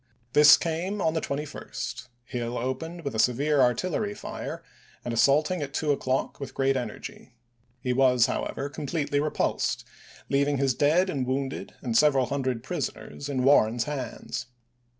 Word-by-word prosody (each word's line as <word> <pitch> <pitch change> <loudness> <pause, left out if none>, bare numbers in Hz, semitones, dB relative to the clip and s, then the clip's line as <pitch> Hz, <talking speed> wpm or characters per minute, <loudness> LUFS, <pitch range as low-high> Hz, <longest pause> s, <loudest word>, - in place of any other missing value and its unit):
This 150 0 +9
came 175 +5 -2
on 160 -4 +1
the 160 - -1
21st; 145 -2 -5 0.2
Hill 120 -1 -3
opening 160 +8 -4
with 140 - -3
a 110 - -2
severe 140 +5 +3
artillery 185 - +1
fire - - -6
Aug., - - -23
im, - - -33 0.4
and 120 - -2
assaulting 150 +8 +3
at 140 0 -5
two 150 -2 +1
o'clock 130 -2 -1
with 140 - -7
great 135 0 +2
energy. 125 0 -6 0.5
He 125 - 0
was, 125 -2 +4
however, 135 +2 -2
completely 145 0 -2
repulsed, 150 +1 -1 0.4
leaving 140 +1 +2
his 135 -1 +2
dead 155 +8 +3
and 135 -8 -2
wounded 135 +1 -3
and 120 -4 -2
several 140 -1 +5
hundred 130 -3 -2
prisoners 145 - -5
in 130 -3 -1
Warren's 120 -4 +4
hands. 135 -6 -5
140 Hz, 155 wpm, -27 LUFS, 125-150 Hz, 0.5 s, This